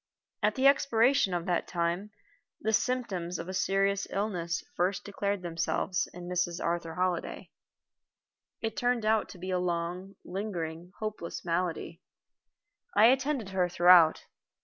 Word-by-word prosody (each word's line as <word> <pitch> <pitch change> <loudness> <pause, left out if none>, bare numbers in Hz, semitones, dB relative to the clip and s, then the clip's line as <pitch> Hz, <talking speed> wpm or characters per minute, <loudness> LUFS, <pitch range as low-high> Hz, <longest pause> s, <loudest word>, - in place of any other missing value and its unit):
At - - +2
the 265 - 0
expiration 270 -4 +4
of 175 -1 -2
that 175 -2 0
time 175 +3 -1 0.5
the 220 +1 -1
symptoms 205 -9 -1
of 165 - -6
a 185 - -5
serious 195 +1 +1
illness 180 -5 -2
first 185 +3 0
declared 200 -1 -2
themselves 170 +2 -1
in 175 0 -9
Mrs. 180 -1 -1
Arthur 170 -1 -2
Holliday. 180 -1 -2 1.1
It 225 -1 -2
turned 245 -2 0
out 220 0 +2
to - - -10
be 185 +2 -5
a 180 - +1
long, 180 +2 -3
lingering, 175 -3 -5
hopeless 215 -7 -5
malady. 170 0 -2 0.9
I 220 +2 +7
attended 265 -5 0
her 185 -2 +1
throughout. 175 -2 +6
185 Hz, 135 wpm, -29 LUFS, 175-210 Hz, 1.1 s, I